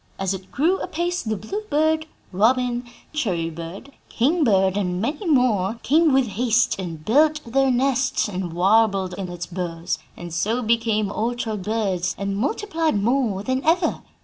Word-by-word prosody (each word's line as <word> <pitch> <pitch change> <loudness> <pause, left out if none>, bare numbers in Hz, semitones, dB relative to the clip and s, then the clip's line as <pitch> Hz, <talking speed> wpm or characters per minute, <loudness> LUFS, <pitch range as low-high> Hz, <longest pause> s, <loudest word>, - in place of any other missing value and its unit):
As 195 0 -1
it 190 0 -8
grew 335 +8 +1
apace 350 +2 -2
the 220 -2 -2
bluebird, 315 - -1 0.2
robin, 240 +5 +2 0.3
cherry 180 - -1
bird, 170 - -8 0.2
king 300 +8 +2
bird, 190 -6 +3
and 180 -3 -1
many 290 - -2
more, 235 - +2
came 315 +3 +4
with 265 -1 +4
haste 235 +1 +1
and 165 -4 -6
built 300 +6 +4
their 270 +3 +2
nests 260 0 +1
and 185 -3 -4
warbled 195 +1 +2
in 185 0 -5
its 175 0 -5
boughs, 170 -2 -4 0.2
and 175 -1 -8
so 220 +8 0
became 220 -2 +1
orchard 225 -2 -2
birds 190 -3 -1
and 200 0 -2
multiplied 325 - 0
more 220 -3 +1
than 260 +3 -1
ever. 330 +2 +2
225 Hz, 150 wpm, -23 LUFS, 190-275 Hz, 0.3 s, came